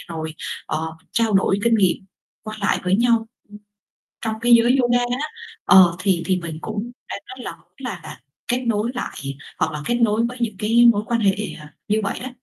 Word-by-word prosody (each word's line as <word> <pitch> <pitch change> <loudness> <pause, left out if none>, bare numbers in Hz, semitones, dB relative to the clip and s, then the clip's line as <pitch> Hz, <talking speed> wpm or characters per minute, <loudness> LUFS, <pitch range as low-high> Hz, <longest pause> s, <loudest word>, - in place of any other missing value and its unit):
rồi, 160 0 -4 0.3
ờ, 160 +1 -2 0.2
trao 225 -2 +1
đổi 195 +1 +3
kinh 230 -1 +4
nghiệm 190 -5 +3 0.5
qua 215 0 -6
lại 200 - +2
với 185 +1 +3
nhau 230 -1 +2 0.9
trong 220 -2 -2
cái 240 0 +3
giới 240 +3 +5
yoga 240 0 +3
á, 250 +5 -1 0.4
ờ, 180 -3 +7
thì 185 -3 +1
thì 185 -1 +2
mình 165 -3 -5
cũng 215 +2 -4 0.2
đang - - -3
rất 255 -1 -9
là - - -4
muốn 170 - -30
là-là 215 -12 -7 0.3
kết 250 +1 0
nối 225 +1 +1
lại 245 - -4 0.4
hoặc - - 0
là 150 - -4
kết 240 - +1
nối 230 -1 +2
với 250 - -8
những 220 -4 -1
cái 230 +3 +4
mối 205 0 -1
quan 235 -1 0
hệ, 195 -2 +3 0.3
ờ, 150 - -11 0.2
như 215 +1 +2
vậy 200 - -3
đó. 260 - -4
220 Hz, 205 wpm, -22 LUFS, 190-240 Hz, 0.9 s, ờ